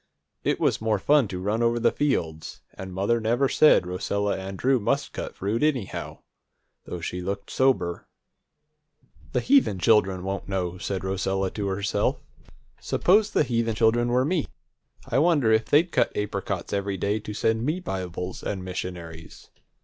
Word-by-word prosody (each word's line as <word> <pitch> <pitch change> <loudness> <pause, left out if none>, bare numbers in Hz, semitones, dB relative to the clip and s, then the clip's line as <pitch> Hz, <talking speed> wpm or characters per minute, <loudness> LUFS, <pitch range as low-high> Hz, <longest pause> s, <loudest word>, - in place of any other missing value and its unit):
It - - 0
was - - +1
more 110 -1 +1
fun 140 +4 +3
to 95 - -5
run 105 +5 -1
over 120 0 +2
the 120 - +3
fields, 80 - -2
and 95 0 -8
mother 100 +6 0
never 120 +5 +2
said 150 - +5
Rosella 100 +3 -1
and 95 0 -6
Drew 130 +3 +2
must 105 - -1
cut - - -6
fruit, 105 +4 -2
anyhow, 140 -10 -2 0.6
though 90 - -6
she 90 +2 -4
looked 100 +2 -4
sober. 125 -10 +1 1.3
"The - - +1
heathen 265 - +3
children 95 -1 +3
won't 100 +1 -4
know," 90 -2 -2
said 95 -2 -3
Rosella 95 0 -1
to 105 -2 -3
herself. 100 +2 0 0.6
"Suppose 205 +4 +3
the - - +2
heathen 115 -2 0
children 115 +2 +3
were 125 +2 +2
me, 165 -1 0 0.6
I 125 - +1
wonder 150 -8 +3
if 110 0 +3
they'd 165 +4 +3
cut - - +2
apricots 105 0 -3
every 100 -1 -1
day 100 +4 0
to 105 0 -7
send 110 +2 +1
me 155 +7 -1
Bibles 90 - -5
and 95 -2 -4
missionaries? 85 -3 -7
105 Hz, 160 wpm, -25 LUFS, 95-120 Hz, 1.3 s, said